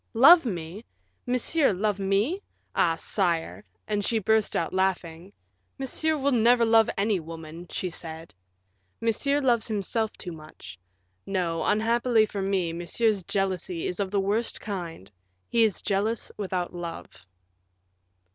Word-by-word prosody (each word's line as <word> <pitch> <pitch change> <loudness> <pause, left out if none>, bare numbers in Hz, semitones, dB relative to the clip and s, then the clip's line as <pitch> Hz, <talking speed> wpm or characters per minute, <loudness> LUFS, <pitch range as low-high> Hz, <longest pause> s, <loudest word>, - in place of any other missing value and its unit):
"Love 300 +5 +8
me! 175 +1 -5 0.4
Monsieur 250 +4 +2
love 205 +1 -1
me! 200 - +1 0.3
Ah! 165 -1 +2
sire," 170 0 -1 0.2
and 210 -1 -1
she 225 - +1
burst 220 0 +1
out 165 - -1
laughing. 185 -2 -1 0.5
"Monsieur 310 +4 +1
will 280 0 +1
never 235 0 +4
love 225 -1 +5
any 200 -1 +1
woman," 165 +1 -9
she 185 - -3
said; 165 -1 -8 0.7
"Monsieur 280 +6 +1
loves 240 -5 +2
himself 220 +1 -1
too 180 - -8
much; 155 - -11 0.5
no, 175 -4 -1
unhappily 225 +1 +3
for 205 -2 -5
me, 190 -4 0
Monsieur's 200 +5 0
jealousy 190 -3 -1
is 180 - -3
of 200 -2 -1
the 200 +1 0
worst 205 +4 -1
kind 175 - -6 0.4
he 230 -1 +3
is 215 -4 0
jealous 210 +3 -1
without 185 -3 -3
love." 170 - -8
200 Hz, 135 wpm, -26 LUFS, 175-225 Hz, 0.7 s, Love